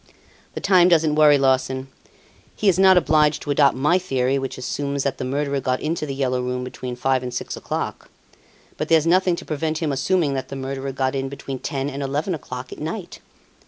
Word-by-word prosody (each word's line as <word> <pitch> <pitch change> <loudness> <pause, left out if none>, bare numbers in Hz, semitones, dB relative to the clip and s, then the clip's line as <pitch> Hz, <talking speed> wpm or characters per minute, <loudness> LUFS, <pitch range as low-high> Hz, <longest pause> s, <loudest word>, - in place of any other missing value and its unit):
"The - - -4
time 185 -3 +5
doesn't 160 -3 +3
worry 150 -1 +6
Larsan. 130 -1 +1 0.7
He 210 - -1
is 190 -2 +4
not 190 -1 +7
obliged 155 -3 +3
to 145 - -3
adopt 140 -2 +4
my 150 +7 +3
theory 135 -6 0
which 135 0 -5
assumes 140 +2 -3
that 140 - -2
the - - -3
murderer 140 +2 -1
got 130 -1 -1
into 155 0 -2
"The 135 - -4
Yellow 130 -2 0
Room" 125 0 -3
between 125 0 -6
five 130 +1 +1
and 125 -1 -5
six - - -4
o'clock. - - -5 0.7
But 155 - -2
there's 160 -1 +4
nothing 180 +1 +3
to - - -9
prevent 155 +1 -2
him 155 -2 -1
assuming 145 +2 +1
that 130 -1 -4
the - - -6
murderer 135 0 -4
got 130 0 -1
in 135 0 -2
between 135 -1 -6
ten 135 +1 -3
and 140 0 -5
eleven 145 +7 -1
o'clock 130 -4 -7
at - - -9
night. 170 +4 -6
140 Hz, 205 wpm, -22 LUFS, 130-155 Hz, 0.7 s, not